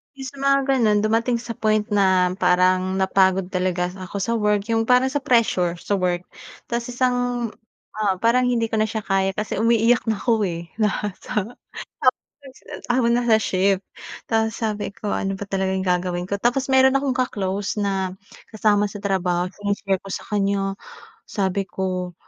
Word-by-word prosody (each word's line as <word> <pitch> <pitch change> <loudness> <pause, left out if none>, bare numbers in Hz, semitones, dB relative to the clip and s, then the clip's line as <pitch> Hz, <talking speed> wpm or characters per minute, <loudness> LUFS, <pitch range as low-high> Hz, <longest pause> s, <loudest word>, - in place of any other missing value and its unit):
Iyong 270 -1 -6
sa 280 - -16
mga 275 0 +3
ganoon, 225 -6 +3
dumating 230 +3 +1
sa 235 - -6
point 215 -1 +2
na 190 -3 +3
parang 185 +1 +3
napagod 190 -1 +2
talaga 180 -1 -1
ako 185 +1 -9
sa 230 - 0
work, 210 -1 +1
iyong 225 0 +1
parang 250 +1 +4
sa 290 - 0
pressure, 230 - +2
sa 200 +3 -2
work. 180 -1 0 0.5
Tapos 235 +1 -2
isang 245 -1 0 0.5
oo, 210 -3 +2
parang 245 +2 +3
hindi 230 -2 0
ko 220 - 0
na 215 - +2
siya 220 0 -3
kaya, 195 -1 +1
kasi 215 0 -3
umiiyak 230 +1 +3
ako, 220 0 +1
eh, 170 -1 -6
na 210 -1 0
sa 210 - -2 1.0
tapos 270 -2 -14 0.3
habang 240 -1 +3
nasa 240 -2 +4
shift. 195 -2 +1 0.4
Tapos 225 -1 0
sabi 215 -2 -2
ko, 200 +1 -4
"Ano 195 0 -2
ba 205 - -6
talaga 190 -1 -1
gagawin 180 -1 -1
ko?" 200 +2 -4
Tapos 245 +3 +1
meron 265 +1 +5
akong 275 -1 -1
ka-close 205 -6 -2
na 190 -2 -1 0.3
kasama 210 -1 +2
sa 205 - -8
trabaho, 185 -3 0
shini-share 200 -2 -2
ko 195 - -11
sa - - -5
kanya. 200 -1 0 0.6
Sabi 195 -1 -1
ko, 185 -1 -3
205 Hz, 165 wpm, -22 LUFS, 190-235 Hz, 1.0 s, meron